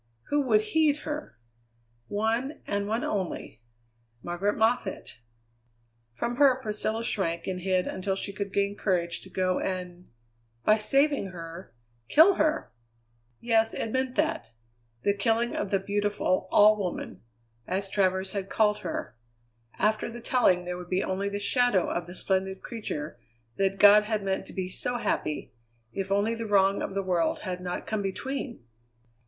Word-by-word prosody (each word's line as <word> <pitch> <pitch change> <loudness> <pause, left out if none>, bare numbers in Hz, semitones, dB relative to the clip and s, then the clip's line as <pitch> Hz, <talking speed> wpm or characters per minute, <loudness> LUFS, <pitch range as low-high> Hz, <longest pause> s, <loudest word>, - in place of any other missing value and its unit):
Who 290 0 +3
would 215 -3 +5
heed 300 +6 +2
her? 300 - -5 0.7
One, 225 +7 -1
and 200 0 -1
one 225 +3 -1
only. 190 - -3 0.6
Margaret 175 +4 -1
Moffatt! 220 - 0 1.0
From 235 - -2
her 270 -2 +5
Priscilla 220 -1 -2
shrank 170 -7 -1
and 185 -1 -3
hid 185 0 +1
until 190 +1 -2
she 200 +1 -3
could 200 0 -4
gain 200 0 0
courage 175 -4 0
to 190 - -11
go 185 0 0
and 180 -1 -4 0.6
by 215 +1 +5
saving 275 +1 +2
her, 165 -5 -9 0.4
kill 335 +6 +7
her! 310 -3 0 0.7
Yes, 225 -1 +2
it 225 - -3
meant 260 0 -1
that. 115 - 0 0.5
The 200 - +3
killing 225 +4 +1
of 200 - -2
the 195 - +3
beautiful 200 -1 0
All 210 +1 +7
Woman, 185 -3 -4 0.5
as 195 +2 -1
Travers 190 -1 +1
had 195 -1 -4
called 210 -1 +2
her. 120 - -5 0.6
After 215 +3 +1
the 235 +1 -8
telling 190 -8 +2
there 180 0 -3
would 175 -1 -9
be 185 +1 +1
only 195 +2 -1
the 200 0 -3
shadow 245 -2 +2
of 175 -1 -3
the 175 - -9
splendid 190 0 -1
creature 150 - -5 0.4
that 195 0 +1
God 205 +1 +8
had 215 -1 -1
meant 190 -1 -2
to - - -10
be 185 -1 -2
so 245 +6 -3
happy, 155 -9 -2 0.4
if 195 0 -3
only 205 +3 +2
the 230 -1 -4
wrong 195 -1 +3
of 195 - -4
the 195 - 0
world 175 -3 0
had 180 -1 -4
not 180 0 -4
come 215 -1 -2
between! 240 - -4
200 Hz, 160 wpm, -28 LUFS, 185-225 Hz, 1.0 s, God